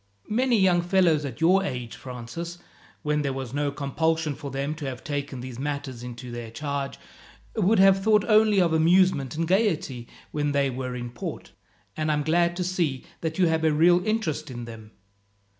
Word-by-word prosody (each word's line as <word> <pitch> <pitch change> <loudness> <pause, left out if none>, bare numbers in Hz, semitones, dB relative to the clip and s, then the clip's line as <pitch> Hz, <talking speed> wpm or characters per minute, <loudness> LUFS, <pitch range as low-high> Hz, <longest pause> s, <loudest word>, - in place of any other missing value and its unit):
"Many 245 +1 +3
young 185 -3 +4
fellows 175 -4 +3
at 140 +3 -7
your 185 +4 +5
age, 125 -10 -4
Francis, 130 +8 -7 0.5
when 150 0 +1
there 140 -2 -1
was 130 -2 -5
no 145 0 0
compulsion 155 +2 -1
for 140 0 -7
them 135 +3 -2
to 150 - -6
have 130 -2 -5
taken 145 -4 -4
these 125 -1 -7
matters 140 -3 -4
into 125 0 -8
their 120 -1 -6
charge, 140 +3 -4 0.6
would 215 +1 +3
have 195 0 +6
thought 210 0 +3
only 215 -2 +5
of 170 -3 +3
amusement 160 -4 +3
and 165 +1 -1
gaiety 165 - 0 0.2
when 145 -1 -1
they 140 -1 +2
were 125 0 -4
in 120 -1 -5
port, 120 - -7 0.4
and 155 0 -1
I - - +2
am 150 - -1
glad 170 +3 +2
to 180 - -2
see 170 -8 -1
that 160 -1 -3
you 185 - +4
have 160 -1 +1
a 160 - +4
real 175 +4 +4
interest 215 -9 -1
in 120 -2 -6
them. 110 -2 -10
150 Hz, 190 wpm, -26 LUFS, 135-175 Hz, 0.6 s, have